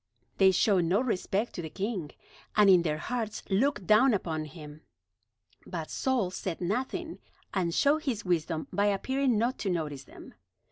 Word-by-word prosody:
They 190 Hz, -1 st, +7 dB
showed 190 Hz, -1 st, +3 dB
no 180 Hz, +5 st, +2 dB
respect 225 Hz, -2 st, -1 dB
to -, -, -5 dB
the 160 Hz, -, -6 dB
king, 195 Hz, -4 st, -3 dB, 0.5 s
and 210 Hz, -2 st, +6 dB
in 180 Hz, -2 st, +6 dB
their 155 Hz, -3 st, -1 dB
hearts 225 Hz, +4 st, -4 dB
looked 215 Hz, +1 st, +1 dB
down 220 Hz, +4 st, +5 dB
upon 160 Hz, -5 st, -3 dB
him. 150 Hz, 0 st, -11 dB, 0.9 s
But 165 Hz, -4 st, -5 dB
Saul 250 Hz, -9 st, 0 dB
said 185 Hz, -2 st, -4 dB
nothing, 260 Hz, -, -3 dB, 0.3 s
and 180 Hz, -4 st, 0 dB
showed 295 Hz, -, +2 dB
his 230 Hz, -7 st, -2 dB
wisdom 165 Hz, -2 st, -1 dB
by 205 Hz, 0 st, +2 dB
appearing 255 Hz, +5 st, +1 dB
not 240 Hz, +5 st, 0 dB
to 200 Hz, -, -2 dB
notice 150 Hz, -6 st, -3 dB
them. -, -, -13 dB
195 Hz, 160 wpm, -29 LUFS, 170-235 Hz, 0.9 s, They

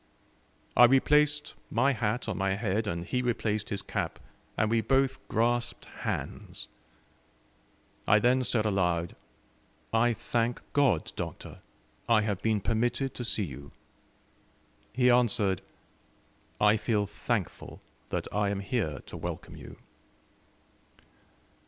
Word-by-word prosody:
I 120 Hz, -, +9 dB
replaced 150 Hz, +3 st, +3 dB, 0.2 s
my 135 Hz, +5 st, +2 dB
hat 115 Hz, +1 st, -1 dB
on -, -, -2 dB
my 95 Hz, 0 st, +1 dB
head, 105 Hz, +1 st, -1 dB
and 85 Hz, -2 st, -3 dB
he 125 Hz, +6 st, -1 dB
replaced 110 Hz, -4 st, -1 dB
his 100 Hz, -, -3 dB
cap, -, -, -3 dB, 0.4 s
and 110 Hz, 0 st, +1 dB
we 115 Hz, -1 st, +3 dB
both 135 Hz, +2 st, +1 dB
grasped 120 Hz, +1 st, 0 dB
hands. -, -, -5 dB, 1.4 s
I 105 Hz, -, +6 dB
then 125 Hz, +4 st, +3 dB
said 115 Hz, -3 st, +2 dB
aloud: 90 Hz, -4 st, 0 dB, 0.8 s
"I 120 Hz, +1 st, +3 dB
thank 120 Hz, +1 st, -1 dB
God, 130 Hz, -, +2 dB
Doctor, -, -, -6 dB, 0.5 s
I 115 Hz, -2 st, +5 dB
have 105 Hz, -3 st, -2 dB
been 110 Hz, -2 st, +1 dB
permitted 120 Hz, +5 st, 0 dB
to 125 Hz, -, -5 dB
see 115 Hz, -2 st, 0 dB
you." 70 Hz, -2 st, -9 dB, 1.2 s
He 125 Hz, +1 st, +3 dB
answered, 105 Hz, -6 st, +3 dB, 1.0 s
"I 105 Hz, +1 st, +5 dB
feel 105 Hz, -1 st, 0 dB
thankful 105 Hz, -1 st, -4 dB, 0.3 s
that -, -, -2 dB
I 105 Hz, 0 st, +1 dB
am 100 Hz, -1 st, -2 dB
here 100 Hz, -, -2 dB
to -, -, -9 dB
welcome -, -, -6 dB
you." -, -, -11 dB
110 Hz, 120 wpm, -29 LUFS, 100-120 Hz, 1.4 s, I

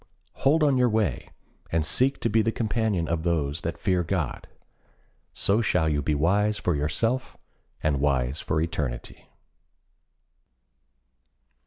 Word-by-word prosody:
Hold 155 Hz, +4 st, +3 dB
on 140 Hz, -3 st, +3 dB
your 125 Hz, -1 st, +4 dB
way, 110 Hz, -2 st, -1 dB, 0.4 s
and 80 Hz, -2 st, +1 dB
seek 130 Hz, -, +1 dB
to -, -, +1 dB
be 110 Hz, +2 st, +3 dB
the 115 Hz, +1 st, +1 dB
companion 110 Hz, -6 st, -1 dB
of 85 Hz, 0 st, -1 dB
those 80 Hz, -3 st, -1 dB
that 85 Hz, -, -4 dB
fear 90 Hz, -3 st, +1 dB
God. 80 Hz, -4 st, -3 dB, 0.8 s
So 105 Hz, +4 st, +1 dB
shall 90 Hz, -7 st, +1 dB
you 75 Hz, -2 st, +1 dB
be 75 Hz, +2 st, 0 dB
wise 100 Hz, +8 st, +2 dB
for 90 Hz, -, 0 dB
yourself 115 Hz, -, -1 dB, 0.5 s
and 75 Hz, -3 st, +1 dB
wise 65 Hz, -1 st, 0 dB
for 80 Hz, -, -1 dB
eternity. 75 Hz, -7 st, -4 dB
85 Hz, 135 wpm, -26 LUFS, 75-110 Hz, 0.8 s, your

